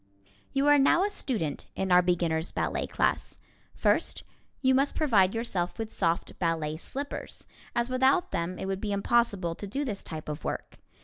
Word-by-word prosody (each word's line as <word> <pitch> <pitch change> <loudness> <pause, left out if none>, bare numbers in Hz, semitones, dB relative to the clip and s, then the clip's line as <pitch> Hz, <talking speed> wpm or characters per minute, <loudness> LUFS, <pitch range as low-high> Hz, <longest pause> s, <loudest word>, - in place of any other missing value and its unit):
You 275 +1 +1
are 290 0 +6
now 310 +6 +5
a 410 - 0
student 215 - -3
in 190 -1 -1
our 180 0 +7
beginner's 170 -2 +1
ballet - - -1
class. - - 0 0.4
First, - - +1 0.4
you 260 -1 +3
must 275 +2 +2
provide 215 -10 +3
yourself 190 -6 -2
with 225 -1 -4
soft 165 0 -1
ballet 160 -3 0
slippers, 280 - -6 0.3
as 235 0 +1
without 265 +7 +2
them 170 +2 -2
it - - -4
would 195 0 -2
be 210 - -2
impossible 200 -4 +1
to 205 - -7
do 275 +9 -2
this 210 -6 -4
type 155 -1 -7
of 150 0 -5
work. - - -5
200 Hz, 175 wpm, -28 LUFS, 175-260 Hz, 0.4 s, our